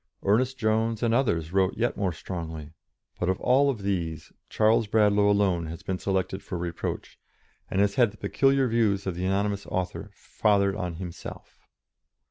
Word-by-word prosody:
Ernest 125 +6 +2
Jones 110 +1 0
and 115 -1 +2
others 85 - 0
wrote 95 -1 +2
yet 120 +2 0
more 95 -3 0
strongly, 80 -3 -6 0.5
but 90 - 0
out - - +4
of - - -12
all 140 +3 +3
these 95 - -3 0.2
Charles 110 0 +3
Bradlaugh 105 -1 +3
alone 95 -5 +2
has 80 +1 -8
been 95 -1 -3
selected 95 0 -1
for 90 - -5
reproach, 85 -1 -5 0.5
and 95 - +1
has 100 0 +2
had 120 -1 +4
the 105 - -16
peculiar 135 +6 +2
views 110 -4 +1
of 95 - -1
the 90 +2 -3
anonymous 100 +1 -1
author 90 -1 -3
fathered 100 -2 +1
on 90 -5 -4
himself. 85 0 -9
100 Hz, 165 wpm, -26 LUFS, 90-110 Hz, 0.5 s, out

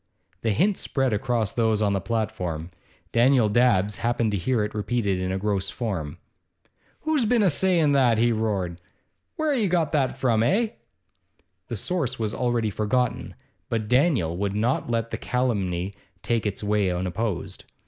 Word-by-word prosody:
The 115 - 0
hint 185 - +2
spread 135 -4 0
among 115 0 0
those 110 -2 +2
on 105 -2 +1
the 100 - 0
platform. 90 -6 -3 0.4
Daniel 120 -1 +4
Dabbs 105 -3 +3
happened 115 -2 0
to 100 - 0
hear 110 +5 0
it 105 - -4
repeated 105 -3 -1
in 95 0 -2
a 95 - -1
gross 100 -1 -1
form. 95 - -4 0.8
'Who's 310 -4 +1
been 230 0 +3
a 185 - +4
sayin' 170 -1 +2
that?' 130 -5 +4
he 120 +2 +3
roared. 100 -6 -2 0.5
'Where 310 -2 0
have 255 - +1
you 200 - +1
got 170 -4 +1
that 135 -4 +1
from, 120 -4 +2
eh?' 210 - +2 1.0
The - - -4
source 145 -9 -2
was 110 -2 -2
already 120 -3 0
forgotten, 115 +3 -1 0.3
but 110 -3 -1
Daniel 125 - +2
would 100 +1 -1
not 120 +4 0
let 115 -1 -1
the - - -2
calumny 100 -7 -1 0.3
take 115 -2 0
its 100 +1 -4
way 105 -2 +1
unopposed. 90 +2 -3
115 Hz, 165 wpm, -25 LUFS, 100-130 Hz, 1.0 s, Daniel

